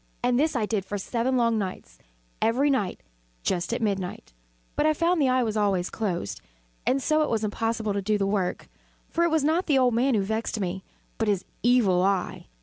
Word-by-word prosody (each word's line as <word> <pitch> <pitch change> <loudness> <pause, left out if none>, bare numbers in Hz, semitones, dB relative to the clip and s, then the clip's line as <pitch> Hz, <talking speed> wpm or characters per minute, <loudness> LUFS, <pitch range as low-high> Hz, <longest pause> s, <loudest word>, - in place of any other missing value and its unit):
And 245 0 +2
this 310 0 +1
I 225 -4 +1
did 210 -2 -1
for 205 +2 -4
seven 240 +6 -1
long 230 -2 +2
nights 190 -2 -6 0.4
every 250 +6 +3
night 210 -9 -1 0.4
just 175 +3 -1
at 235 0 -1
midnight 190 - -3 0.4
but 300 - +2
I 310 - +3
found 335 +1 +2
the 270 - +3
eye 255 0 +3
always 195 -4 +1
closed; 185 - -3 0.5
and 265 0 +2
so 310 0 +2
it 305 - +1
was 225 -1 0
impossible 220 0 -1
to 200 - -1
do 210 +2 +1
the 200 - 0
work; 195 -2 -1 0.4
for 340 - +1
it - - +2
was 315 -2 +2
not 320 +5 +1
the 290 -4 +4
old 250 -2 +3
man 250 +2 +2
who 200 - +2
vexed 220 +2 -2
me, 190 -1 -3 0.4
but 225 - +1
his 200 -3 0 0.2
Evil 225 -7 +4
Eye. 195 -1 -1
225 Hz, 205 wpm, -26 LUFS, 200-260 Hz, 0.5 s, the